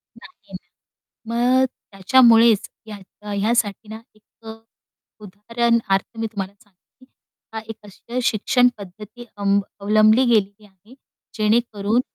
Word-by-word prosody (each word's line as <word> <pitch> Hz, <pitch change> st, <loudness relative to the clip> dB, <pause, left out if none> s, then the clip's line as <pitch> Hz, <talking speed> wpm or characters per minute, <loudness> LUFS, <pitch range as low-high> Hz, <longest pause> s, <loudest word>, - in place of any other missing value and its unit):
नाही -, -, -18 dB
ना. 240 Hz, +3 st, -3 dB
मग -, -, +3 dB, 0.3 s
त्याच्यामुळेच 225 Hz, +2 st, +4 dB, 0.2 s
या 210 Hz, 0 st, -10 dB
यासाठी 210 Hz, 0 st, -1 dB
ना, 220 Hz, +1 st, -9 dB
एक 215 Hz, -, -28 dB, 1.0 s
उदाहरणार्थ 225 Hz, +1 st, -2 dB
मी 225 Hz, -, -2 dB
तुम्हाला 195 Hz, -2 st, -6 dB
सांगते, 205 Hz, +6 st, -28 dB, 0.5 s
हा 220 Hz, -, -4 dB
एक 225 Hz, -, -7 dB
अशी 235 Hz, +5 st, -7 dB
शिक्षणपद्धती 215 Hz, -1 st, -1 dB
अम 200 Hz, 0 st, +1 dB, 0.2 s
अवलंबली 215 Hz, +4 st, +3 dB
गेलेली 210 Hz, -3 st, 0 dB
आहे. 205 Hz, +4 st, -22 dB, 0.4 s
जेणेकरून, 215 Hz, 0 st, 0 dB
215 Hz, 105 wpm, -20 LUFS, 200-235 Hz, 1.0 s, त्याच्यामुळेच